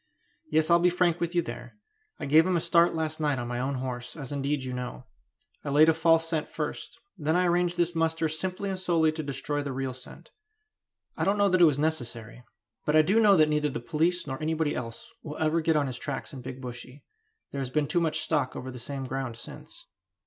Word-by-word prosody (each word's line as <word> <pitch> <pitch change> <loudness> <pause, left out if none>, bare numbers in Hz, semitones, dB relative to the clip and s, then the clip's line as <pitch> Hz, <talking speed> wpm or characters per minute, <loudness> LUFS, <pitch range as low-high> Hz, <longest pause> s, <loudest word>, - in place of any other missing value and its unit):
Yes, 160 +1 +2
I'll 170 - +7
be 175 +1 +4
frank 175 -1 +1
with 170 +1 -2
you 175 - +3
there. 120 - -8 0.4
I - - -4
gave 155 +4 +5
him 185 -2 +2
a - - +2
start 170 +1 +3
last 155 -1 -2
night 150 -3 +1
on 120 0 -4
my 120 0 -3
own 135 +2 -1
horse, 125 -1 -5
as 140 -3 -7
indeed 140 0 -1
you 130 -1 -4
know. 125 -1 -6 0.6
I - - -4
laid 150 +3 +6
a - - +5
false 165 0 +3
scent 160 -2 -2
first; - - -5 0.2
then 155 +2 +1
I 180 0 +3
arranged 175 0 +1
this 175 0 +1
muster 165 0 +1
simply 185 +5 -2
and 190 - -3
solely 165 -4 +2
to 155 0 -4
destroy 145 +1 -3
the 140 -1 -4
real 130 0 -3
scent. 125 0 -12 0.8
I - - -2
don't 200 +1 +2
know 200 -1 +4
that 185 -1 +3
it - - +9
was 150 -4 +3
necessary; 120 -6 -2 0.4
but 150 - +1
I 155 - +7
do 200 +8 +3
know 205 -3 +6
that 155 -1 +5
neither 150 0 +1
the - - -4
police 165 +8 0
nor 135 +1 -5
anybody 160 -1 0
else 115 - -6
will 150 -1 -7
ever 160 +1 +1
get 160 0 +2
on 145 -1 +2
his 125 -2 -4
tracks 140 -1 -4
in 130 - -7
Big 130 +1 -8
Bushy; 125 +2 -9 0.5
there 140 - -3
has 130 - -3
been 150 +3 +1
too 170 +4 +1
much 155 -1 0
stock 145 -5 0
over 130 +1 -6
the 125 - -9
same 135 +3 -5
ground 130 -2 -4
since." - - -11
155 Hz, 235 wpm, -28 LUFS, 130-165 Hz, 0.8 s, it